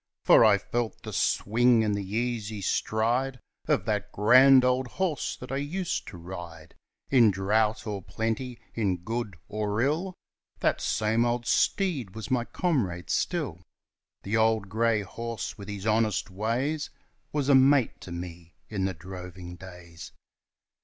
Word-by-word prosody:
For -, -, +7 dB
I 105 Hz, -3 st, +6 dB
felt 120 Hz, +2 st, -3 dB
the -, -, -7 dB
swing 115 Hz, +2 st, +3 dB
and 105 Hz, -1 st, +1 dB
the 100 Hz, 0 st, -2 dB
easy 110 Hz, +1 st, -2 dB
stride 120 Hz, +6 st, 0 dB, 0.3 s
Of -, -, +1 dB
the 105 Hz, -2 st, 0 dB
grand 130 Hz, +5 st, +6 dB
old 125 Hz, 0 st, +1 dB
horse 170 Hz, +3 st, -2 dB
that 125 Hz, -, -9 dB
I 135 Hz, -, -1 dB
used 170 Hz, +6 st, -3 dB
to 90 Hz, -, -9 dB
ride 85 Hz, -2 st, -9 dB, 0.4 s
In 120 Hz, -5 st, +6 dB
drought 105 Hz, +4 st, +1 dB
or 105 Hz, -3 st, -4 dB
plenty, 115 Hz, +5 st, -3 dB
in 100 Hz, -5 st, 0 dB
good 110 Hz, -3 st, -4 dB
or 105 Hz, 0 st, -2 dB
ill, 160 Hz, +9 st, 0 dB, 0.4 s
That -, -, +1 dB
same 110 Hz, +2 st, +1 dB
old 120 Hz, 0 st, -1 dB
steed 135 Hz, -, +1 dB
was 110 Hz, 0 st, -7 dB
my 120 Hz, -2 st, +1 dB
comrade 105 Hz, -, -1 dB
still; 140 Hz, -, -1 dB, 0.6 s
The 105 Hz, +4 st, 0 dB
old 110 Hz, -2 st, +2 dB
grey 110 Hz, 0 st, +1 dB
horse 115 Hz, +4 st, -5 dB
with 100 Hz, -, -8 dB
his 100 Hz, 0 st, -6 dB
honest 110 Hz, -3 st, +1 dB
ways 125 Hz, +10 st, -1 dB, 0.4 s
Was 145 Hz, -2 st, -1 dB
a 140 Hz, -, +5 dB
mate 135 Hz, -1 st, +4 dB
to 90 Hz, -, -9 dB
me 85 Hz, -1 st, -8 dB
in 100 Hz, -3 st, -1 dB
the 95 Hz, -2 st, -2 dB
droving 90 Hz, +1 st, -9 dB
days. 90 Hz, -2 st, -11 dB
110 Hz, 150 wpm, -27 LUFS, 95-125 Hz, 0.6 s, For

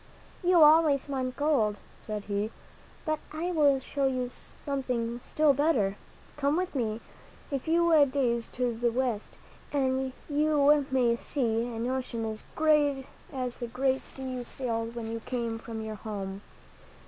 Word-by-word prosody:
You 350 Hz, -2 st, +6 dB
always 300 Hz, -3 st, +5 dB
want 260 Hz, -2 st, -2 dB
gold," 265 Hz, -9 st, +2 dB, 0.2 s
said 210 Hz, -1 st, -5 dB
he, 205 Hz, +1 st, -1 dB, 0.6 s
"but 310 Hz, -1 st, 0 dB
I 330 Hz, +4 st, -2 dB
will 290 Hz, -5 st, +4 dB
show 275 Hz, +1 st, -1 dB
you 255 Hz, -2 st, -1 dB
something 250 Hz, -4 st, -4 dB
still 300 Hz, +3 st, +3 dB
better. 265 Hz, -9 st, +2 dB, 0.4 s
Come 290 Hz, +2 st, +1 dB
with 365 Hz, 0 st, -1 dB
me 225 Hz, -4 st, -1 dB, 0.5 s
a 275 Hz, -, 0 dB
few 330 Hz, +1 st, +4 dB
days 245 Hz, -4 st, 0 dB
to 245 Hz, -1 st, 0 dB
the 235 Hz, +1 st, +1 dB
West, 240 Hz, -3 st, -2 dB, 0.3 s
and 265 Hz, -2 st, 0 dB, 0.2 s
you 295 Hz, -1 st, +3 dB
may 250 Hz, -3 st, +3 dB
see 235 Hz, -2 st, -1 dB
an 230 Hz, -1 st, -3 dB
ocean 250 Hz, -3 st, -2 dB
as 220 Hz, 0 st, -5 dB
great 295 Hz, -4 st, +3 dB, 0.3 s
as 255 Hz, -3 st, -4 dB
the 240 Hz, -, -3 dB
great 265 Hz, +3 st, 0 dB
sea 265 Hz, -, -7 dB
you 245 Hz, -, -4 dB
sailed 230 Hz, -2 st, -3 dB
when 225 Hz, -1 st, -4 dB
you 230 Hz, -, -3 dB
came 230 Hz, -1 st, -3 dB
from 225 Hz, -1 st, -6 dB
your 215 Hz, -1 st, -5 dB
home." 195 Hz, -2 st, -5 dB
260 Hz, 150 wpm, -29 LUFS, 230-290 Hz, 0.6 s, You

